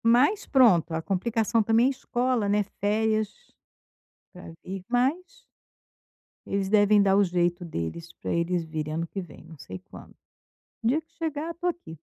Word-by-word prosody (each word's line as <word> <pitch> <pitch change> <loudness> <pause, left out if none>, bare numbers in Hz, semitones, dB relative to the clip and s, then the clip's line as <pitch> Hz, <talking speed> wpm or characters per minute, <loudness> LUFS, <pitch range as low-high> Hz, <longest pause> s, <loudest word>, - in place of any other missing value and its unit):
Mas 255 - +4
pronto, 190 - +4
a 160 - -1
complicação 220 +5 0
também 225 +3 +3
é - - +3
escola, 245 -4 -1
né, 205 +1 +2 0.2
férias 215 +1 +1 1.0
pra 180 -2 -11
vir, 190 0 -6
mas 265 +9 0 1.0
eles 195 -1 -2
devem 205 0 +5
dar 195 -1 +4
o 205 - +5
jeito 175 -1 0
deles 165 - -5
pra - - -6
eles 170 +1 0
virem 155 -1 -4
ano 165 +1 -2
que 195 - -5
vem, 170 -4 -12
não 160 -1 -13
sei 95 -8 -9
quando. - - -14 0.7
O - - -3
dia 270 +7 +3
que 320 +1 -38
chegar, 320 -2 -3
eu 335 - -5
tô 350 +1 -5
aqui. 340 - -4
205 Hz, 170 wpm, -26 LUFS, 175-245 Hz, 1.0 s, devem